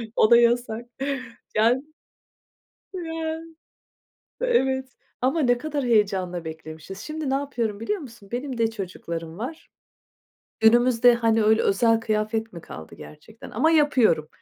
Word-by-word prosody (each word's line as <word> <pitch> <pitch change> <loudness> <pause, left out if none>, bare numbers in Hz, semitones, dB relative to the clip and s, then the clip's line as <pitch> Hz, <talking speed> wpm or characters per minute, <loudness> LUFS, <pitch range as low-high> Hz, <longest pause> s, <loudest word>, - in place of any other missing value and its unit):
O 215 - +4
da 235 - +9
yasak. 235 -1 +2 0.7
Yani 235 +5 +3 1.1
Ya. 325 -2 -4 1.0
Evet, 265 - +1 0.3
ama 270 +6 +1
ne 245 -3 +3
kadar 290 -1 -3
heyecanla 190 -6 +1
beklemişiz. 160 +4 -8
Şimdi 305 +1 -4
ne - - +1
yapıyorum 240 -7 -2
biliyor 390 - -2
musun? 230 -8 -12
Benim 255 0 -4
de 225 -1 +2
çocuklarım 170 -5 -6
var. 265 +9 -7 0.9
Günümüzde, 240 +2 +5
hani, 225 -2 +2
öyle 220 +1 +4
özel 225 +3 +3
kıyafet 220 0 -2
mi 170 - -8
kaldı 80 0 -10
gerçekten 185 +9 -13
ama 315 +9 +2
yapıyorum. 255 - +3
230 Hz, 125 wpm, -24 LUFS, 210-265 Hz, 1.1 s, da